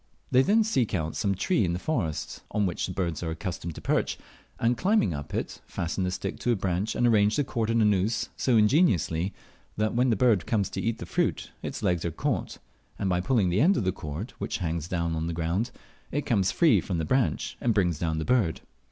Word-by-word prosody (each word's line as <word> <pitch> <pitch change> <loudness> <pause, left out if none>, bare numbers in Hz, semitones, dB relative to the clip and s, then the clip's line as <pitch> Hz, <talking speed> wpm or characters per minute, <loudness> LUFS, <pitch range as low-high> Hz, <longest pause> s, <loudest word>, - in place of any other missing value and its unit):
They 130 - +6
then 215 +10 +4
seep 130 - 0
out 80 -3 -2
some 100 -2 0
tree 135 - +1
in 85 -2 0
the - - -1
forest 90 - -2
on 105 -1 +1
which 90 -2 -1
these 90 - -6
birds 85 -5 -2
are 85 - -2
accustomed 85 -1 -5
to - - -8
perch, - - 0 0.4
and 120 +1 +2
climbing 190 - +2
up 70 0 -6
it - - -4
fasten 85 +3 -2
the 90 - 0
stick 90 0 -4
to 120 - +1
a - - +3
branch 95 +1 -1
and 120 - +2
arrange 105 -3 +4
the 145 - +2
cord 115 -4 -2
in 115 -1 +3
a - - +4
noose 105 +2 +1
so 125 -3 +2
ingeniously, 105 - +3 0.5
that 110 +1 +1
when 125 +2 +2
the 115 - +3
bird 110 -3 +3
comes 105 -4 0
to - - -3
eat 115 0 -1
the - - -7
fruit - - -1
its - - -5
legs 90 -2 +1
are 85 - 0
caught, 80 - -2 0.4
and 95 - -1
by 90 0 +1
pulling 100 -2 +2
the 90 +5 +2
end 190 +5 +4
of - - 0
the 95 - +1
cord, 85 - -6
which - - -2
hangs 85 -4 -2
down 85 -2 -1
to 80 0 -2
the 85 - -2
ground, 85 +8 -1 0.4
it 145 0 -1
comes 100 -4 +2
free 125 - +4
from 90 0 -3
the 80 - -1
branch 130 - 0
and 120 - +2
brings 90 -6 +1
down 80 -2 -1
the 80 - -2
bird. 115 -10 +1
100 Hz, 235 wpm, -27 LUFS, 85-120 Hz, 0.5 s, They